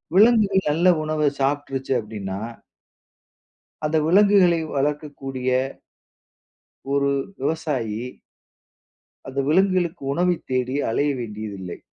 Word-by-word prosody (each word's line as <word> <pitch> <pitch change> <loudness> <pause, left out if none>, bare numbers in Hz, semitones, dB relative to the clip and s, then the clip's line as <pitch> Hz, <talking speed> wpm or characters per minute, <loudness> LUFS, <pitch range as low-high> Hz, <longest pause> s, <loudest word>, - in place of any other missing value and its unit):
விலங்குகள் 205 -3 +5
நல்ல 170 +4 +4
உணவ 155 -1 0
சாப்பிட்டுருச்சு 135 -1 -1
அப்டின்னா 100 -3 -5 1.5
அந்த 160 +1 +1
விலங்குகளை 190 -1 +5 0.2
வளர்க்கக்கூடிய 135 -2 -2 1.4
ஒரு 140 0 +2 0.3
விவசாயி 135 -8 -2 1.3
அந்த 135 +1 -4
விலங்குகளுக்கு 180 -1 +2
உணவை 175 +3 +2 0.2
தேடி 130 +1 0
அலைய 145 +5 +1
வேண்டியதில்லை. 105 -5 -6
145 Hz, 80 wpm, -23 LUFS, 130-175 Hz, 1.5 s, விலங்குகள்